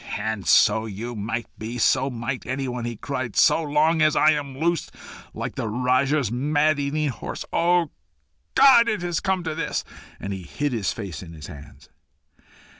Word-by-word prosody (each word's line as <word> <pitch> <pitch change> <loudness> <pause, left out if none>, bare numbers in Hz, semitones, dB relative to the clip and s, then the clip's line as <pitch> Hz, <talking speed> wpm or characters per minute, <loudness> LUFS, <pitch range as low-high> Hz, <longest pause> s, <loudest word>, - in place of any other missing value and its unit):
"And 105 -4 -3
so 110 0 +4
you 115 +4 -6
might 115 +2 -3
be 115 +3 -5
so 130 +3 +2
might 120 +1 -4
anyone," 130 -2 -3
he 120 0 -4
cried, 130 -1 -4
"so - - +5
long 155 +2 +2
as 155 0 +4
I 155 - +5
am 140 -3 -3
loose 170 +3 0 0.4
like - - -5
the - - -3
Rajah's 130 +2 +1
man 145 +4 +1
eating 145 +1 -1
horse. 125 - -6
O 170 -2 +2 0.6
God! 235 -4 +7
It 210 -6 -2
has 175 -2 -1
come 190 -2 -1
to 160 -2 -3
this!" 155 -1 -2 0.4
And 100 - -4
he 95 - -6
hid 145 - -3
his 110 -5 -1
face 95 -9 -6
in 85 -3 -10
his 75 -2 -10
hands. 70 0 -12
130 Hz, 175 wpm, -24 LUFS, 115-155 Hz, 0.6 s, God